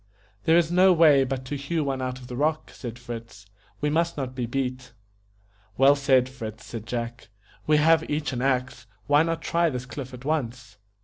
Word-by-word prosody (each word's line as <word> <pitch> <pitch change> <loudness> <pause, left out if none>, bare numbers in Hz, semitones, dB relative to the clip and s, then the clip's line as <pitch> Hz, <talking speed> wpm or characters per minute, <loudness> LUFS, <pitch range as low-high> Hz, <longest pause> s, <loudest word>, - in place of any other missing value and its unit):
"There 165 +1 +5
is 170 -1 +2
no 185 +2 +6
way 155 -5 +6
but 130 0 -4
to 140 +3 -4
hew 150 +3 -2
one 135 -2 -2
out 130 0 -3
of 130 - -12
the 125 - -7
rock", 155 +4 -1
said 120 -2 -8
Fritz, 115 -4 -9 0.4
"we 150 0 +1
must 170 +1 0
not 130 -2 -3
be 125 -2 -3
beat." 125 0 -3 0.8
"Well 135 +2 +6
said, 135 -3 +3
Fritz," 115 -4 -8
said 115 -2 -8
Jack; 120 0 -5 0.4
"we 155 0 +5
have 160 +2 +3
each 150 -1 -2
an 125 - -3
axe. 130 -1 -1 0.2
Why 145 +1 +4
not 165 0 -1
try 170 0 +2
this 125 -3 -5
cliff 130 0 -7
at 125 +1 -11
once?" 125 -7 -3
135 Hz, 195 wpm, -25 LUFS, 125-150 Hz, 0.8 s, no